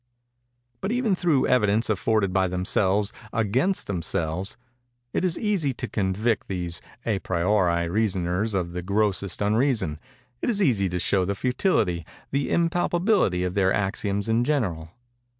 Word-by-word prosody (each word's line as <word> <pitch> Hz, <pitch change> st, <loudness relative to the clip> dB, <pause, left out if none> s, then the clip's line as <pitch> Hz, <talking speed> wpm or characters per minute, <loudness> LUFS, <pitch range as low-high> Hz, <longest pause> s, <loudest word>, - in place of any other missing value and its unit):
"But, 195 Hz, -, -1 dB
even 240 Hz, -4 st, +1 dB
through 170 Hz, -7 st, +2 dB
evidence 110 Hz, -2 st, +2 dB
afforded 105 Hz, -1 st, +1 dB
by 95 Hz, -1 st, +3 dB
themselves 95 Hz, +3 st, 0 dB, 0.2 s
against 120 Hz, -, +1 dB
themselves, 85 Hz, +1 st, -2 dB, 0.6 s
it -, -, 0 dB
is 180 Hz, -2 st, +1 dB
easy 195 Hz, -, 0 dB
to -, -, -4 dB
convict 105 Hz, +3 st, 0 dB
these 90 Hz, -3 st, -3 dB, 0.2 s
à 105 Hz, -4 st, 0 dB
priori 85 Hz, -1 st, +1 dB
reasoners 95 Hz, +1 st, 0 dB
of 90 Hz, -2 st, -1 dB
the 90 Hz, +1 st, -4 dB
grossest 100 Hz, 0 st, 0 dB
unreason—it 110 Hz, -, -1 dB
is 215 Hz, -4 st, +1 dB
easy 110 Hz, -, +2 dB
to 90 Hz, -, -2 dB
show 95 Hz, +2 st, +1 dB
the 100 Hz, +2 st, -1 dB
futility—the 125 Hz, -, -1 dB
impalpability 175 Hz, -, +2 dB
of 90 Hz, -1 st, -2 dB
their 95 Hz, -1 st, +2 dB
axioms 100 Hz, +1 st, -1 dB
in 115 Hz, +1 st, +2 dB
general. 100 Hz, -, -1 dB
100 Hz, 135 wpm, -25 LUFS, 90-125 Hz, 0.6 s, by